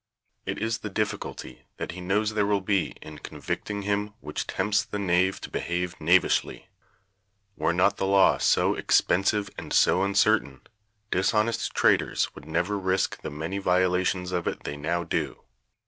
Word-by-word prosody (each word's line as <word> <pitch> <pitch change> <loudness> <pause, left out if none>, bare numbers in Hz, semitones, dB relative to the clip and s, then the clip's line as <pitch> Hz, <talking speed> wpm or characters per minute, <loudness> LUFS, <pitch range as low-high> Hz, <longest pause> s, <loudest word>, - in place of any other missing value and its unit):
It - - -2
is 115 +2 -1
the 105 - -5
difficulty 100 - -4
that - - -4
he 90 +1 -8
knows 105 +4 0
there 105 -2 +1
will 100 -1 +2
be 95 -1 0
in 75 -1 -10
convicting 100 +6 -5
him 105 +1 -1
which - - -5
tempts 100 +2 +1
the 105 - -5
knave 95 -1 +1
to - - -7
behave 90 0 -2
knavishly. 85 +4 +2 0.9
Were 80 - +1
not 90 +4 +2
the 95 - -1
law 100 0 +4
so - - +3
expensive 100 +2 +2
and - - -9
so 90 - +4
uncertain, 100 -7 +2 0.5
dishonest 105 +5 +1
traders - - +2
would - - -13
never 90 +6 -1
risk 95 0 0
the - - -5
many 80 +7 -4
violations 90 0 +1
of 90 -2 -2
it - - -3
they 75 - -4
now 85 +4 -2
do. 85 - -3
95 Hz, 160 wpm, -26 LUFS, 90-105 Hz, 0.9 s, law